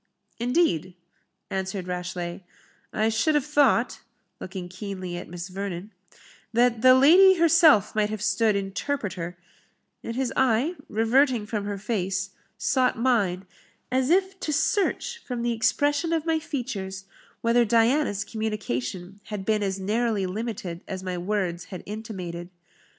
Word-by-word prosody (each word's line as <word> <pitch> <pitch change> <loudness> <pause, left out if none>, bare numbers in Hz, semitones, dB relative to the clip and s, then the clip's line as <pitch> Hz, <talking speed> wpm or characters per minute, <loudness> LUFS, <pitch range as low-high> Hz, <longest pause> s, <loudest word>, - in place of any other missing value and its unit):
"Indeed?" 235 - +1 0.6
answered 190 -1 -3
Rashleigh; 180 -1 -4 0.5
"I 215 +1 +1
should 225 +8 +1
have 290 -3 +2
thought" 285 -5 +2 0.4
(looking 185 -1 -6
keenly 185 -1 -6
at 175 - -7
Miss 175 0 -6
Vernon) 195 +1 -5 0.6
"that 235 0 +2
the 255 +1 +8
lady 360 +8 +7
herself 330 - +5
might 215 -1 +1
have 215 0 -4
stood 215 0 +2
interpreter;" 195 -4 -3 0.7
and 230 - -5
his 260 -1 -1
eye, 260 +5 +2 0.2
reverting 235 +1 +2
from 210 -1 -3
her 205 -1 -3
face, 195 -2 -2 0.3
sought 255 -3 +1
mine, 205 -7 +1 0.5
as 260 +1 +1
if 380 +2 +2
to 305 - -2
search, 420 +8 0
from 245 -2 -4
the 240 0 +1
expression 290 +8 +1
of 325 -1 0
my 325 -1 +1
features, 200 -11 -5 0.4
whether 235 +1 +4
Diana's 230 -1 +2
communication 200 - -4
had 205 -3 -5
been 215 0 +1
as 195 -1 -1
narrowly 215 0 0
limited 190 -3 -4
as 190 -1 -5
my 185 -1 -3
words 180 -2 -2
had 185 - -8
intimated. 185 -5 -6
215 Hz, 135 wpm, -25 LUFS, 190-255 Hz, 0.7 s, the